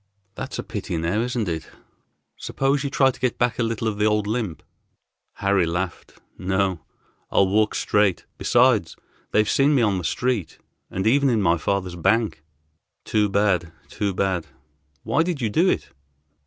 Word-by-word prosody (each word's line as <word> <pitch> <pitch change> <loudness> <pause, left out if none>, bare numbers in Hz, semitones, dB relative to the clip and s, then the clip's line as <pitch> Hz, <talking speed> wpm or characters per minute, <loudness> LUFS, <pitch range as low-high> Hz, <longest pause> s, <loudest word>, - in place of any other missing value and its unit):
"That's - - -6
a - - -3
pity, - - -4
now, 85 +7 0
isn't 120 -3 -2
it? 80 -2 -4 0.7
Suppose 135 +1 -1
you 140 - -1
try 135 -1 +3
to - - -16
get 125 -1 0
back 120 -1 0
a - - +2
little 115 0 -2
of 105 -2 -2
the 105 - +3
old 105 -1 +2
limp." 105 -6 -3 0.7
Harry 100 -3 +1
laughed. 90 +2 -4 0.3
"No, 95 -1 0 0.5
I'll 100 - +3
walk 105 +2 +2
straight. 105 -4 +1
Besides 120 -8 +3 0.3
they've 105 0 +2
seen 140 +5 +3
me 125 - +3
on 100 -4 +1
the - - -6
street, 120 -1 -1 0.3
and 95 +2 -3
even 140 +4 +4
in 115 -3 +2
my 85 -4 +2
father's 90 +1 -1
bank." 95 -2 +1 0.6
"Too 105 -1 +1
bad, 95 -4 +1 0.2
too 100 -1 -2
bad. 95 -3 -1 0.6
Why 155 - +1
did 170 -3 -1
you 115 -5 -1
do 175 - +3
it?" - - -1
105 Hz, 170 wpm, -23 LUFS, 95-120 Hz, 0.7 s, even